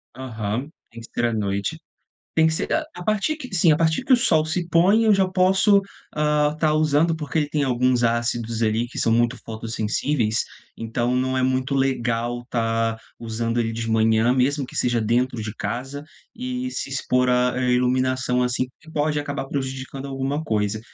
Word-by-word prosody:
Aham, 120 0 -4 0.2
tem 115 0 -11
que 115 - -11
ser 120 - 0
à 120 - 0
noite. 100 +8 -2 0.6
Tem 160 0 +4
que - - 0
ser 160 - -2
a 315 -1 +1
a 175 - -7
partir 215 +8 0
que 255 -10 -8
sim. 170 -2 +4
A 150 - +5
partir 160 +5 +1
que 265 - +2
o - - +8
sol 160 -10 +3
se 170 +2 -2
põe 190 +7 +4
eu 215 -2 +5
já 190 -1 +2
posso, 190 +2 +4 0.4
ah, 150 -1 +2
estar 155 -1 +1
usando, 155 +2 +2
porque 160 0 -3
ele 150 -2 +1
tem 150 -1 -1
alguns 125 -1 +2
ácidos, 115 -1 0
ali, 110 +2 +1
que - - -8
são 115 - +2
muito 120 +2 +2
fotossensíveis, 110 +2 -1 0.3
então, 120 +2 -1
não 130 +1 0
é 130 - +1
muito 130 +1 0
legal 120 -2 0
estar 115 -2 -1 0.2
usando 115 +1 -2
ele 115 -1 -1
de 115 0 -4
manhã, 110 +1 +3
mesmo 135 +2 +1
que - - -14
seja 120 -1 +1
dentro 120 +2 0
de 110 0 -5
casa, 135 +6 -4 0.3
e 255 +1 -4
se - - -4
expor 125 -1 +1
à 125 0 +2
à 125 0 0
iluminação 125 0 +1
assim, 125 +1 0
que 160 - -15
pode 150 -1 0
acabar 145 -2 -4
prejudicando 135 0 -4
alguma 135 +2 -2
coisa, 110 -5 -1
130 Hz, 190 wpm, -23 LUFS, 115-155 Hz, 0.6 s, o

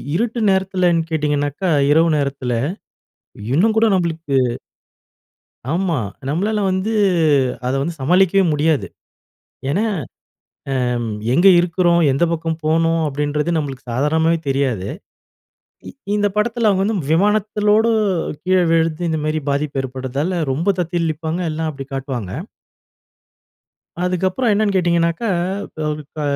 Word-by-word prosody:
இருட்டு 230 +3 -1
நேரத்துலன்னு 185 -3 +2
கேட்டிங்கனாக்கா, 145 +2 -1 0.2
இரவு 165 +2 +4
நேரத்துல 140 -3 -2 1.0
இன்னும் 215 +8 +3
கூட 225 - +4
நம்பளுக்கு 165 -5 -1 1.4
ஆமா. 175 -1 0 0.3
நம்மளால 205 +8 0
வந்து 190 +4 -1 0.8
அத 130 - 0
வந்து 170 +4 -2
சமாளிக்கவே 185 +6 +3
முடியாது. 150 - +1 0.8
ஏன்னா 185 +9 +1 1.0
அ - - 0 0.5
எங்க 175 +7 +5
இருக்குறோம்? 175 0 +2
எந்த 135 +5 +1
பக்கம் 165 -1 -2
போணும்? 165 +1 +2
அப்டின்றது 150 +3 -1
நம்மளுக்கு 135 -4 -4
சாதாரணமாவே 160 +6 +1
தெரியாது. 130 -8 0 1.0
இ - - -6 0.3
இந்த 205 0 +2
படத்துல 225 +1 +2
வந்து 210 +3 +1 0.2
விமானத்தோடு 210 +3 +2 0.5
கீழ 185 +1 +2
விழுந்து 165 0 +1
இந்த 160 - -1
மாதிரி 155 0 -1
பாதிப்பு 140 -1 -1
ஏற்படுவதால 135 +7 -3
ரொம்ப 160 +9 -2
தத்தளிப்பாங்க. 165 -1 -2
எல்லாம் 160 +1 -2
அப்டி 135 -1 -8
காட்டுவாங்க. 130 -7 -4 1.7
அதுக்கப்புறம் 185 +6 0
என்னென்னு 205 -1 +1
கேட்டீங்கனாக்கா, 170 +3 +1 0.5
ப - - -11 0.2
இப்ப 150 +2 -9
165 Hz, 105 wpm, -19 LUFS, 145-190 Hz, 1.7 s, எங்க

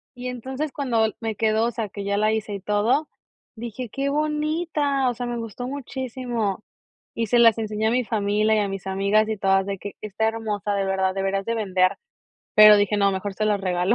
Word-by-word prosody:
Y 250 +1 -6
entonces, 265 +4 -4
cuando 230 -6 0
me 220 -2 -2
quedó, 220 +1 +2
o 240 - 0
sea, 225 -3 -4
que 200 +1 -7
ya 200 0 0
la 215 +1 +2
hice 220 -1 -3
y 200 - -7
todo, 220 +10 +1 0.5
dije: 235 +1 -6
"¡Qué 275 +4 -2
bonita!" 300 -2 0
O - - -1
sea, 245 +2 -4
me 240 0 -3
gustó 230 +2 -6
muchísimo 245 -6 -3 0.5
y 230 -1 -1
se 240 +3 +3
las 230 -2 +6
enseñé 215 0 -1
a - - +2
mi 250 0 +1
familia 215 0 +1
y - - +2
a 205 -1 0
mis 195 -1 -6
amigas 200 +3 +2
y 220 - -2
todas 195 -1 +2
de 200 - -3
que: 205 - -7
"Está 215 +1 -1
hermosa, 210 -3 -3
de 195 -1 0
verdad, 190 -1 0
deberías 195 0 -1
de 230 - -1
vender", 190 -4 +1 0.6
pero 215 0 +9
dije: 205 +1 +2
"No, 200 -1 +3
mejor 195 +1 -4
se 215 - -1
las 205 -2 +1
regalo". 185 +2 +1
215 Hz, 215 wpm, -23 LUFS, 200-245 Hz, 0.6 s, pero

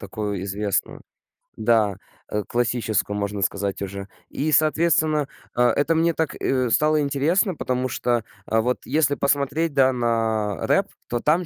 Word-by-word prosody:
такую 105 -4 -4
известную. 100 0 -2 0.6
Да, 110 -3 +2 0.3
э, 105 -1 -1
классическую, 115 -4 0
можно 100 -1 -2
сказать, 100 +1 -1
уже. 100 0 -6 0.2
И, 155 +3 -2
соответственно, 155 -1 +3 0.3
а, 125 0 +3
это 145 +6 +1
мне 165 0 +2
так, 160 -2 -1
э, 130 -3 0
стало 155 +3 +3
интересно, 155 +8 +1
потому 130 -3 -2
что, 120 -2 -1 0.2
а, 110 0 +2
вот 125 +2 -1
если 145 +1 +2
посмотреть, 145 +3 0
да, 130 -1 +4
на 110 -5 -1
рэп, - - +2 0.2
то 120 - -1
там 165 +7 +1
125 Hz, 145 wpm, -23 LUFS, 105-150 Hz, 0.6 s, да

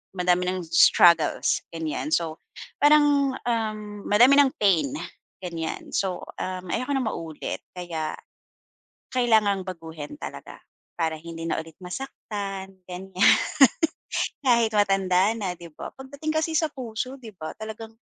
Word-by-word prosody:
madami 180 0 +2
nang 185 0 -2
struggles, 170 0 +5
ganyan. 165 - -3
So, 165 -1 -2 0.4
parang, 290 -2 +5
uhm, 215 -3 -3
madami 250 +7 +6
ng 275 -2 +5
pain, 170 -10 +3 0.5
ganyan. 165 -2 -5
So, 190 -2 -1 0.2
uhm, 185 -1 -4
ayoko 270 +3 -1
nang 255 -4 0
maulit 160 -2 -5 0.2
kaya 165 -3 -4 1.0
kailangang 220 -6 +3
baguhin 165 - -7
talaga - - -8 0.4
para 160 -1 0
hindi 165 0 -7
na - - 0
ulit 160 0 -11
masaktan, 195 -2 -6
ganyan, 185 +1 -8 1.3
kahit 235 -4 +4
matanda 195 0 +3
na, 195 -5 -2
di 170 - -10
ba? 150 - -8
Pagdating 285 +4 -5
kasi 320 +1 0
sa 315 -1 +1
puso, 255 +1 -5
di 230 - -9
ba, 155 -2 -6
talagang 220 +1 -7
195 Hz, 125 wpm, -25 LUFS, 175-245 Hz, 1.3 s, madami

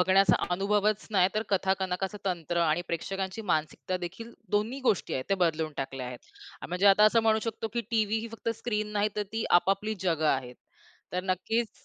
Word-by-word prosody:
बघण्याचा 190 +1 +5 0.2
अनुभवच 210 +2 +1
नाही 185 -3 +4
तर 215 - +1
कथा 190 0 +3
कनकाच 190 +2 -2
तंत्र 175 -2 -1
आणि 160 +2 +1
प्रेक्षकांची 190 +5 -3
मानसिकता 155 +4 -1
देखील 230 +7 -10 0.2
दोन्ही 230 +6 -2
गोष्टी 220 - +1
आहेत 130 - -2
त्या 195 - +2
बदलून 160 -3 0
टाकल्या 135 -1 -4
आहेत. 125 -1 -7 0.5
म्हणजे 180 +3 +1
आता 200 +1 +7
असं 225 +2 +5
म्हणू 220 -1 +4
शकतो 225 0 -4
की 235 - +1
टीव्ही 220 -1 +2
ही 230 +1 -5
फक्त 230 0 -5
स्क्रीन 210 -2 -2
नाही 210 0 +2
तर 210 - +1
ती 225 0 -1 0.2
आपापली 200 +4 0
जगं 165 -4 +1
आहेत. 125 -2 -1 0.6
तर 180 +1 -1
नक्कीच 210 +5 -1
195 Hz, 180 wpm, -29 LUFS, 175-215 Hz, 0.6 s, आता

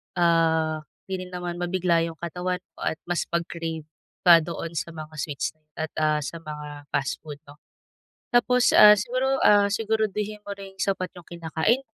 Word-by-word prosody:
ah, 160 -2 +2 0.3
hindi 190 -1 -4
rin 180 - -15
naman 175 -1 -4
mabigla 175 -2 +1
yung 165 - -7
katawan 180 +2 -3 0.2
mo - - -4
at - - 0
mas 175 - 0
pag-crave 165 -1 -3 0.4
pa 170 -2 +9
doon 165 0 -5
sa 170 - -6
mga 155 0 -8
sweets 145 -2 -2 0.3
at, 160 -1 -3
ah, 155 -1 +2
sa 165 - -6
mga 150 -2 -8
fast 135 - -1
food, 150 -2 -8
'no. 145 - -14 0.8
Tapos, 245 +1 +4
ah, 210 0 +10
siguro, 260 +5 0
ah, 205 -1 +6
siguraduhin 215 -1 -1
mo 205 - -5
rin 195 -1 -11
sapat 190 -2 -1
yung 175 -2 -12
kinakain. 170 - 0
175 Hz, 165 wpm, -25 LUFS, 160-200 Hz, 0.8 s, ah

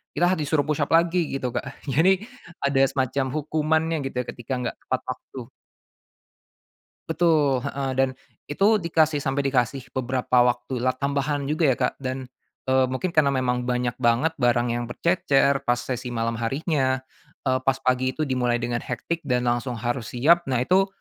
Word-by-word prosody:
kita 175 +2 +3
disuruh 150 -2 0
push 150 0 +1
up 145 - -5
lagi 170 0 +3
gitu, 135 -2 -2
Kak, - - -5
jadi 175 +8 +3 0.4
ada 140 -1 +2
semacam 130 0 0
hukumannya 160 +2 0
gitu - - -9
ya 125 - -2
ketika 125 +2 -6
nggak 115 - -3
tepat 130 0 -2
waktu. 125 -1 -9 1.6
Betul, 160 -5 +3
heeh, 140 -1 -2
dan 135 - +4 0.4
itu 205 +8 +3
dikasih 160 -3 +2
sampai 135 +1 0
dikasih 130 0 0
beberapa 130 -1 0
waktulah, 125 +1 -1
tambahan 140 +1 -1
juga 155 +2 +1
ya - - -14
Kak, 125 - 0
dan, 130 -1 -4 0.4
eee, 130 0 +4
mungkin 130 +8 -2
karena 155 -4 +3
memang 125 -1 0
banyak 125 -1 -1
banget 125 +6 +2
barang 120 -1 +2
yang 120 0 -2
bercecer 140 0 +2
pas 120 0 +2
sesi 125 0 -4
malam 115 0 -1
harinya, 130 +1 0 0.5
eee, 130 -1 +2
pas 135 0 +2
pagi 130 0 +1
itu 155 - -2
dimulai 125 -2 +1
dengan 120 0 -1
hectic 125 +7 -3
dan 125 -2 +1
langsung 120 +1 -2
harus 120 -1 -3
siap, 165 +8 +4
nah 130 -3 0
itu, 190 +8 +3
135 Hz, 165 wpm, -24 LUFS, 125-155 Hz, 1.6 s, dan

